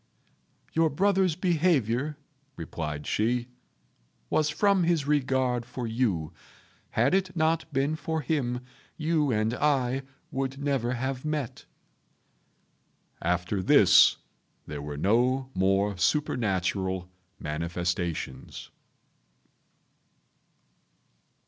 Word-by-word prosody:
"Your 165 0 +3
brother's 190 +1 +2
behaviour," 155 - +1 0.4
replied 75 -2 -5
she, 120 +3 0 0.8
"was 155 -1 +2
from 195 +3 +3
his 165 -4 +1
regard 130 -4 +1
for 125 +1 -6
you. 110 -9 -1 0.6
Had 120 +7 +3
it 190 -1 +1
not 160 0 +1
been 140 +3 0
for 160 0 -3
him, 125 -4 -1 0.4
you 155 -3 +1
and 110 0 +1
I 135 -2 +1 0.3
would 135 0 -2
never 135 -4 0
have 130 +1 -3
met." 150 -5 -3 1.6
After 90 +3 0
this - - +6 0.5
there 75 -1 -6
were 75 0 -6
no 125 - +1
more 95 +2 +2
supernatural 95 - 0 0.3
manifestations. 85 +2 -4
130 Hz, 90 wpm, -27 LUFS, 100-155 Hz, 1.6 s, this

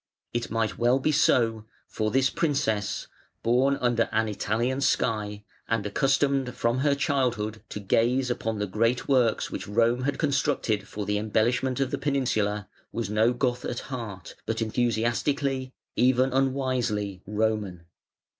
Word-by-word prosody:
It 120 0 -2
might 115 -1 -1
well 120 +2 +4
be 145 +3 +1
so, 115 -7 +2 0.2
for 110 -1 -1
this 130 +2 +2
princess, 135 - 0 0.4
born 130 +4 +3
under 120 -2 +1
an 110 0 +1
Italian 120 +6 -1
sky, 105 -6 0 0.2
and 115 -3 0
accustomed 135 +2 +1
from 115 +2 0
her 140 +1 +3
childhood 120 -6 0
to - - -5
gaze 120 +5 +2
upon 115 -2 -2
the 105 - -1
great 115 +5 0
works 125 -5 +2
which - - -5
Rome 115 +4 +2
had 140 +2 -1
constructed 115 -8 0
for 105 -1 -5
the 105 0 0
embellishment 120 +5 +1
of 135 -1 0
the - - -2
peninsula, 110 -8 0 0.2
was 115 -3 -3
no 110 +3 +3
Goth 125 0 -1
at 120 - -3
heart, 105 -8 -6
but - - -1
enthusiastically, 125 +4 0 0.2
even 130 +1 +3
unwisely, 130 -8 0
Roman. 105 -4 -1
120 Hz, 145 wpm, -27 LUFS, 110-130 Hz, 0.4 s, well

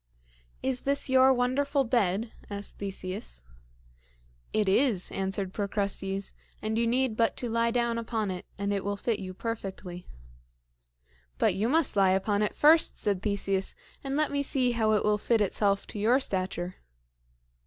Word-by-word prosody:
"Is 260 -1 -1
this 280 0 +1
your 260 0 +6
wonderful 265 +3 +1
bed?" 225 -3 0 0.2
asked 200 0 -5
Theseus. 190 - -6 1.1
"It 215 -2 +1
is," 205 -1 +3
answered 195 0 -2
Procrustes, 200 -1 -2 0.3
"and 215 0 -2
you 230 +1 +1
need 250 -1 +1
but 230 0 +1
to 245 - -2
lie 230 0 +1
down 235 -1 0
upon 225 -3 -2
it, 180 -1 -7
and 200 +1 -1
it 200 - -2
will 205 0 -2
fit 225 +1 -1
you 185 -1 -7
perfectly." 190 -5 -6 1.3
"But - - +3
you 205 +5 0
must 320 0 +2
lie 195 -2 +4
upon 200 +2 +1
it 210 - -1
first," 315 +2 +5
said 200 -3 0
Theseus, 195 -2 0 0.3
"and 270 0 -3
let 305 +1 +1
me 285 0 0
see 265 -3 +1
how 220 -2 +2
it 210 - +2
will 210 0 +2
fit 230 +2 +2
itself 200 0 +1
to 210 - -7
your 235 +6 +4
stature." 185 -6 -2
215 Hz, 160 wpm, -28 LUFS, 195-245 Hz, 1.3 s, your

